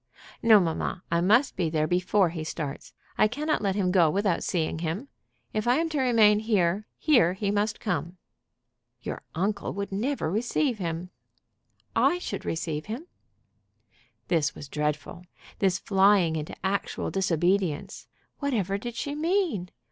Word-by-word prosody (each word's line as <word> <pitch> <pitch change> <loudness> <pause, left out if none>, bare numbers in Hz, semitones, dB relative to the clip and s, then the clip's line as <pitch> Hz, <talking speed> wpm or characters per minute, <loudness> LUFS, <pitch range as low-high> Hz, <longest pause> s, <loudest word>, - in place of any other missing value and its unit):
"No, 220 -2 +7
mamma. 175 +1 -2
I 170 0 +2
must 230 +10 +3
be 175 -3 0
there 155 -1 +1
before 180 +2 +2
he 160 -1 -5
starts. 150 -2 -5 0.3
I - - +6
cannot 300 +7 -1
let 195 -2 0
him 190 -3 +1
go 175 -4 +5
without 195 +1 0
seeing 160 -3 -1
him. 170 - -3 0.4
If 215 +2 -1
I 245 - +5
am 325 +3 0
to 300 -4 -1
remain 220 -5 +5
here, 210 -2 +1
here 240 - +4
he 200 +1 -1
must 210 +1 0
come." 185 -4 -3 0.9
"Your - - -5
uncle 200 +4 -1
would 200 0 -4
never 215 - -1
receive 240 - 0
him." 170 0 -4 0.8
"I 350 - +4
should 355 - -5
receive 160 -1 -3
him." 235 +10 -5 1.2
This 160 -3 +1
was 145 - -9
dreadful 150 +4 -3 0.4
this 190 -2 +2
flying 190 -4 +3
into 155 -1 -4
actual 195 +1 -1
disobedience. 180 -3 0 0.3
Whatever 205 - -1
did 240 +2 -6
she 285 - -3
mean? 320 - 0
195 Hz, 150 wpm, -27 LUFS, 170-225 Hz, 1.2 s, No